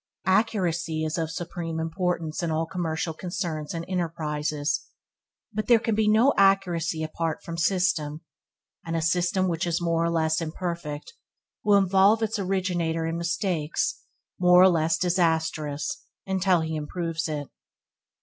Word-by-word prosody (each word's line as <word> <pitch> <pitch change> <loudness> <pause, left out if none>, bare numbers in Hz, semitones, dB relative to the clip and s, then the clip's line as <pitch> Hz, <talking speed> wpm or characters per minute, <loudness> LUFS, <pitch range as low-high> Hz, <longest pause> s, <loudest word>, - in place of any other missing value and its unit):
Accuracy 175 -5 +1
is 155 +3 -2
of 160 -1 -1
supreme 165 -1 -4
importance 165 -1 -2
in 170 - -1
all 160 +1 0
commercial 165 -1 -2
concerns 165 -3 -4
and 165 0 -4
enterprises, 155 -4 -2 0.7
but 215 +1 -2
there 240 - +7
can 225 0 -1
be 215 0 +2
no 225 +6 +5
accuracy 175 -5 +2
apart 160 0 -3
from 170 - -6
system, 170 -4 0 0.6
and 165 0 -3
a 165 - 0
system 180 +3 +1
which 175 0 -1
is 170 -1 0
more 165 -1 +1
or 170 - +1
less 160 -1 +1
imperfect 165 - -5 0.5
will 205 -1 +5
involve 195 +3 +4
its 220 0 -1
originator 180 -4 -1
in 165 0 -2
mistakes 170 -2 -1 0.4
more 180 0 +7
or 190 - +8
less 165 -2 +2
disastrous 160 -5 0 0.2
until 190 -2 +2
he 160 0 -3
improves 165 +2 -3
it. 150 -2 -4
170 Hz, 140 wpm, -26 LUFS, 160-185 Hz, 0.7 s, or